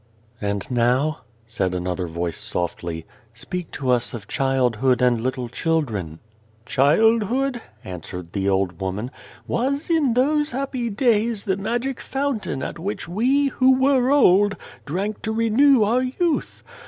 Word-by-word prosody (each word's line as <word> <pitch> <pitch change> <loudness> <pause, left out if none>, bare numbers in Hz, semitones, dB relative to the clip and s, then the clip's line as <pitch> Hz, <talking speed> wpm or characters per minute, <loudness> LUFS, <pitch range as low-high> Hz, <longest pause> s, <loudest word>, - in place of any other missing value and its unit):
"And 100 -1 -2
now," 125 +6 +2 0.3
said 95 -5 -2
another 90 0 -2
voice 85 +1 -3
softly, 85 -1 -4
" - - -29
speak 175 +8 -4
to 130 -3 -1
us 120 -1 +1
of 105 -4 -9
childhood 130 -2 +1
and 125 -3 +2
little 130 0 -2
children." 115 - -2 0.2
" 110 0 -34
Childhood," 225 - +2 0.2
answered 90 -1 -8
the 100 -1 0
old 95 -3 0
woman, 100 +6 -3 0.2
" - - -22
was, 280 +6 -1
in 290 -8 +2
those 295 +4 +2
happy 255 -2 -3
days, 225 -1 +1
the 190 -3 +1
magic 240 +6 -2
fountain 270 - -2
at - - -5
which 200 +5 -4
we, 260 +10 +2
who 260 0 +4
were 260 -1 +3
old, 205 -8 +4 0.3
drank 195 +7 -3
to 220 - -2
renew 230 +3 +4
our 235 +5 +2
youth. 295 +6 -1
180 Hz, 145 wpm, -22 LUFS, -, 0.3 s, who